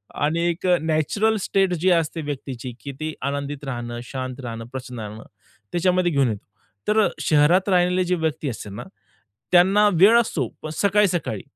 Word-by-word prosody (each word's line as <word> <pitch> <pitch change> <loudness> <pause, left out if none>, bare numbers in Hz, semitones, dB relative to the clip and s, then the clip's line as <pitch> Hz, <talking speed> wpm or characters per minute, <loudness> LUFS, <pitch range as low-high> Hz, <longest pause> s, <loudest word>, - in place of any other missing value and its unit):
आणि 155 +3 0
एक 170 +2 -4 0.2
natural 160 +8 +1
state 195 -2 +1
जी 180 +2 +1
असते 165 -1 +1
व्यक्तीची 135 -4 -6
की 140 - -6
ती 155 0 -3
आनंदित 140 +1 -3
राहणं, 120 -2 -5
शांत 130 0 -6
राहणं, 115 -1 -6
प्रसन्न 125 -2 -7
राहणं 110 +1 -7 0.5
त्याच्यामध्ये 180 0 +2
घेऊन 140 -4 +2
येतो. 105 -2 -5 0.4
तर 215 +1 +3
अ, - - +1
शहरात 165 +6 +3
राहिलेले 180 0 +3
जे 180 - +1
व्यक्ती 160 -3 -2
असते 110 -3 -7
ना, 100 - -7 0.7
त्यांना 195 +4 +6
वेळ 200 +8 +6
असतो 145 - -2 0.2
पण 155 - -4
सकाळी-सकाळी. 190 - +1
155 Hz, 160 wpm, -23 LUFS, 130-180 Hz, 0.7 s, त्यांना